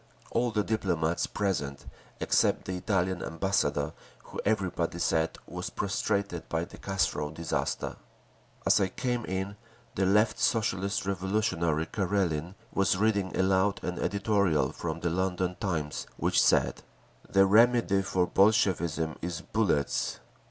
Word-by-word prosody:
All 120 +1 +1
the 105 -2 0
diplomats 85 -6 0
present 75 -9 -2 0.3
except - - +2
the 95 - -3
Italian 95 -1 0
ambassador, 95 +4 0 0.3
who - - -6
everybody 95 -5 0
said 80 -1 +1
was - - -5
prostrated 100 -2 -2
by 80 +1 -1
the 95 - -13
Carso 95 -6 -1
disaster…. 80 0 -2 0.7
As - - +5
I 95 - +3
came 120 +4 -2
in, 95 +2 -3 0.4
the 95 0 +1
Left 105 +3 +3
Socialist 100 -5 0
Revolutionary 95 -5 0
Karelin 90 -3 -1 0.2
was 95 -1 +2
reading 100 -2 +1
aloud 95 +1 +2
an 90 -1 -3
editorial 100 -8 +1
from - - -4
the 85 - 0
London 90 0 -1
Times 80 -6 -2
which - - +2
said, - - +3 0.5
"The 95 0 +5
remedy 110 -1 +4
for 95 -1 +1
Bolshevism 85 -6 +2
is 85 -1 -4
bullets!" 105 -10 0
95 Hz, 125 wpm, -29 LUFS, 85-100 Hz, 0.7 s, As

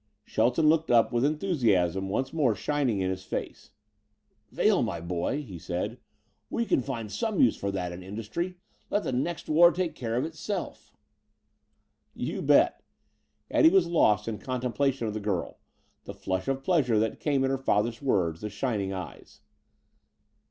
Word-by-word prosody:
Shelton 125 +8 +2
looked 160 +1 +3
up 115 -2 +4
with 120 +1 +1
enthusiasm 115 - +1
once 130 +6 -2
more 140 -9 +2
shining 125 -2 0
in 95 0 0
his 95 0 -5
face. - - -6 0.8
"Vail, - - +2
my 85 - -2
boy," 90 - -2
he 95 -10 -9
said, 95 +9 -4 0.5
"we 235 - -1
can 135 - +2
find 115 -5 -5
some 220 - -2
use 120 - +5
for 100 - -3
that 90 -3 -3
in 85 +1 -8
industry. 115 - -5 0.3
Let 205 - 0
the - - -2
next 150 +7 -2
war 170 +3 +6
take 180 -2 -2
care 115 -2 -4
of 125 +4 0
itself." 165 +6 -5 1.2
"You - - -3
bet!" - - +4 0.7
Eddie 320 - +6
was 385 +3 +4
lost 105 - +2
in 110 -2 -3
contemplation 130 0 -1
of 105 - -3
the 110 - -3
girl 100 -5 -3 0.5
the - - -8
flush 95 0 -3
of 135 0 -1
pleasure 135 -10 +2
that 110 0 0
came 140 -3 +1
at 135 - +1
her 135 - -1
father's 115 -2 0
words; 90 - 0
the 105 - -4
shining 100 -2 -2
eyes. 95 -2 -8
120 Hz, 165 wpm, -28 LUFS, 100-150 Hz, 1.2 s, war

